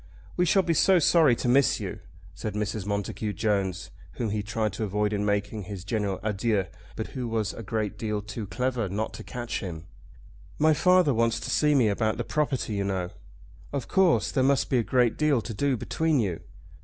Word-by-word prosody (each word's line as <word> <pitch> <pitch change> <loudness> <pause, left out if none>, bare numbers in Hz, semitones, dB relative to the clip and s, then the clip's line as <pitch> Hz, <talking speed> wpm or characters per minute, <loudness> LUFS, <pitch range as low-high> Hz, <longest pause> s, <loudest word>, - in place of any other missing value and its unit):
"We 180 - +2
shall 190 +2 +4
be 170 -1 +1
so 185 +4 +5
sorry 160 -5 +5
to 125 - -3
miss 135 +3 +4
you," - - -5 0.3
said 105 -2 -5
Mrs. 105 -1 -2
Montacute 105 +1 -2
Jones, 100 -5 -1 0.2
whom 115 -3 -2
he 105 0 -1
tried 105 -1 -2
to 110 - -3
avoid 105 +1 0
in 100 0 0
making 105 0 -1
his 100 -3 -7
general 100 -2 -2
adieux, 105 -1 0 0.3
but - - -4
who 125 -2 -4
was 110 -3 -1
a - - -8
great 110 -1 -3
deal 105 -2 -1
too 105 +1 -6
clever 125 -2 -1
not 105 +4 -3
to - - -8
catch 120 -1 -4
him. 85 -4 -6 0.7
"My 155 +1 +4
father 180 -2 +4
wants 115 0 +1
to - - -4
see 150 -1 +3
me 125 -5 +4
about 110 +1 0
the - - -2
property, 145 -7 -1
you 100 -1 -1
know." 95 -2 -2 0.6
"Of 140 -4 -3
course. 190 -3 +3
There 130 - +1
must 140 +1 +2
be 130 - +4
a - - +1
great 125 -1 +2
deal 150 -4 +3
to 115 +1 -6
do 135 +3 0
between 160 +5 0
you." 95 -7 -1
110 Hz, 205 wpm, -27 LUFS, 105-135 Hz, 0.7 s, so